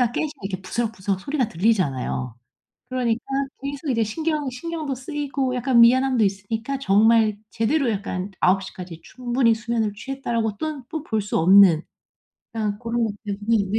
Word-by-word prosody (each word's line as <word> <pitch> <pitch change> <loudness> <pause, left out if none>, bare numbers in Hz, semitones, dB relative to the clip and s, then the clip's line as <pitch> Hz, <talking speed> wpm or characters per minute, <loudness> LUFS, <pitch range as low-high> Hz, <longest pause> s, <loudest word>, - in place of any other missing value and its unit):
아이가 240 -2 +2
깨시면 300 +3 -2
이렇게 195 -1 -4
부스럭부스럭 195 -2 -2
소리가 275 +1 -1
들리잖아요. 145 - 0 0.5
그러니까 240 -2 0 0.4
계속 280 +1 -4
이제 230 -3 +2
신경이 300 +4 -2
신경도 310 +2 -4
쓰이고 275 -1 -3
약간 250 -1 +3
미안함도 255 0 +5
있으니까 220 +7 -2
정말 215 -1 +4
제대로 250 +4 +1
약간 195 -2 -3
'9 190 +1 +3
시까지 180 -3 -9
충분히 240 -2 +1
수면을 225 -2 -1
취했다.'라고 230 -3 -3
또 310 -1 -4
뽀 315 0 -4
볼 220 -7 -1
수 205 - -1
없는 180 -1 +7 0.7
그냥 210 -2 -2
고런 230 0 -1
것 220 - -1
때문에 205 +2 0
네 220 - +2
230 Hz, 375 characters per minute, -23 LUFS, 200-265 Hz, 0.7 s, 없는